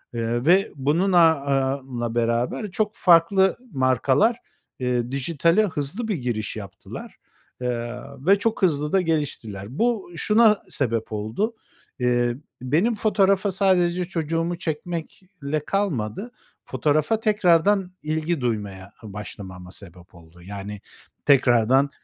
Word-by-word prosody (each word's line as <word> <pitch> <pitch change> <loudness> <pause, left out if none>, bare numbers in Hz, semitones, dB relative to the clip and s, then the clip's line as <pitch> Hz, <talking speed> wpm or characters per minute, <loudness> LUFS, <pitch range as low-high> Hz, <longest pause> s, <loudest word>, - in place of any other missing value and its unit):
ııı, 120 +2 -1
ve 190 +4 +4
bunun 155 +8 +1
aaa, 160 -5 +4
a 135 -2 -1
la 120 -1 -3
beraber 120 - -1
çok 210 +1 0
farklı 185 +2 +4
markalar, 130 - +2 0.4
eee, 125 -1 -1
dijitale 165 +8 +2
hızlı 165 - -4
bir 210 - 0
giriş 120 -7 -3
yaptılar, 100 -4 -9 0.5
ııı, 125 +3 -5
ve 195 +2 +5
çok 225 +1 -1
hızlı 150 -4 +2
da 190 - +4
geliştiler. 145 - -3
Bu 230 -6 0
şuna 215 +3 +4
sebep 115 -5 -1
oldu. 110 - -2 0.4
Eee, 120 -1 +1 0.3
benim 165 - +1
fotoğrafa 200 -2 +2
sadece 180 -2 +2
çocuğumu 165 0 -2
çekmekle 165 -2 -5
kalmadı, 195 - -2 0.3
fotoğrafa 155 +8 +1
tekrardan 195 -2 +3
ilgi 155 0 -1
duymaya 100 -5 -3
başlamama 95 -3 -9
sebep 90 -2 -13
oldu, 85 +1 -17
yani, 100 +2 -7 0.4
tekrardan 130 -1 +4
145 Hz, 115 wpm, -23 LUFS, 120-185 Hz, 0.5 s, ve